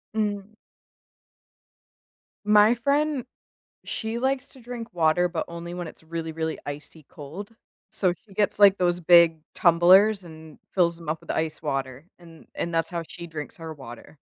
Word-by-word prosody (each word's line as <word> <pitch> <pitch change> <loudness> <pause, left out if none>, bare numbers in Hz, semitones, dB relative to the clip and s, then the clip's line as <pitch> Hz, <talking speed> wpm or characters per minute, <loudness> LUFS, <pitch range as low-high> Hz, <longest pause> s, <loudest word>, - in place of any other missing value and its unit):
Mm. 205 -1 -2 1.9
My 210 +2 +6
friend, 280 +2 0 0.6
she 225 +1 -4
likes 265 +1 -1
to 260 - -8
drink 235 -1 -8
water, 170 +1 +2
but 170 -2 -3
only 170 +1 -7
when 175 -1 -5
it's - - -11
really, 165 0 -5
really 160 0 -3
icy 150 +2 -8
cold. 160 +9 -9 0.4
So, 185 -3 +1
she 190 +3 -16
gets, 205 -1 +1
like, 200 -1 +7
those 175 -1 +1
big 170 -1 +6 0.2
tumblers 185 +4 +5
and 160 -2 -13
fills 170 -3 +2
them 165 -2 -12
up 155 +1 -2
with - - -10
ice 160 0 -2
water 135 0 -3
and 165 -2 -16
and 170 0 -3
that's 165 - +1
how 170 -2 -3
she 170 -1 -9
drinks 155 -3 -7
her 160 -1 -7
water. 135 0 -12
170 Hz, 160 wpm, -25 LUFS, 160-205 Hz, 1.9 s, like